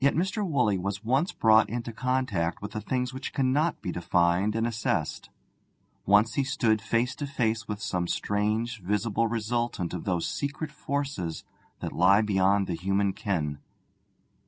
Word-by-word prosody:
Yet 140 - +4
Mr. 190 +6 0
Woolley 125 - +1
was 100 +2 -3
once 135 - +1
brought 110 0 +4
into 115 +1 -4
contact 125 -9 -1
with 105 - -6
the 110 - -4
things 125 +3 -2
which 130 +1 -6
cannot 140 +4 +1
be 90 - -2
defined 90 +4 +1
and 115 0 +1
assessed; 115 -2 -2 0.8
once 105 +3 +5
he 140 - +1
stood 110 -5 +1
face 115 +3 0
to 145 - -3
face 115 -6 -1
with 105 -1 -4
some 90 -5 -2
strange 105 +4 -1
visible 105 +4 0
resultant 115 -4 -2
of 90 - -5
those 90 -3 0
secret 145 +2 -3
forces 140 - -3 0.4
that - - -4
lie 95 +4 +5
beyond 100 -1 +2
the 90 - -3
human 95 +3 0
ken. 75 -9 -2
110 Hz, 160 wpm, -27 LUFS, 95-125 Hz, 0.8 s, once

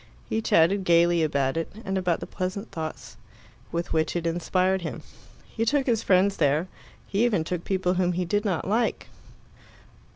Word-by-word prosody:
He 220 - -1
chatted 190 0 +3
gaily 170 -1 +4
about 140 -2 0
it, 165 - -3
and 190 - -2
about 180 -3 0
the - - -4
pleasant 190 +3 -4
thoughts 160 -1 -6 0.5
with 170 0 -3
which 160 +1 0
it 170 -1 -2
inspired 185 +3 +1
him; 170 - -6 0.4
he 225 - -3
took 275 +4 +1
his 230 -3 +1
friends 195 +1 +3
there; 150 +3 +2 0.4
he 205 +3 0
even 210 -9 +2
took 175 +1 -4
people 185 -2 0
whom 180 -1 +1
he 180 +1 -1
did 205 +5 0
not 190 -6 -1
like. 225 +4 0
180 Hz, 170 wpm, -26 LUFS, 165-200 Hz, 0.5 s, gaily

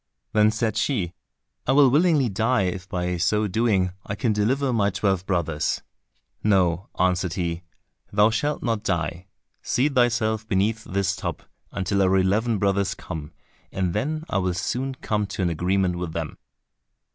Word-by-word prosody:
Then 105 0 +5
said 110 -1 -1
she, 95 - 0 0.5
"I 130 - +4
will 140 -2 +6
willingly 150 -2 +4
die, 110 +1 +1
if 95 +1 -3
by 90 0 -1
so 105 +5 +1
doing 95 -3 +1
I 100 - -4
can 110 +1 0
deliver 130 +6 +1
my 100 -3 +2
twelve 95 -2 0
brothers." 80 -5 -1 0.6
"No," 95 -3 +2
answered 90 -1 +1
he, 85 -2 -2 0.5
"thou 105 +2 +4
shalt 145 +7 -1
not 115 -3 0
die, 85 -1 -2 0.3
seat 140 +3 +1
thyself 115 -4 +1
beneath 105 +4 0
this 95 0 0
tub 90 -6 -5 0.3
until 100 +1 0
our 95 0 +4
eleven 105 +5 +2
brothers 100 0 +1
come, 80 -5 -7 0.4
and 90 -2 -1
then 155 - -1
I 100 - 0
will 90 -2 -1
soon 130 +8 -2
come 105 -4 -1
to 95 0 -3
an 85 - +1
agreement 90 +2 +1
with 85 -3 -4
them." 80 -2 -4
100 Hz, 160 wpm, -24 LUFS, 90-115 Hz, 0.6 s, will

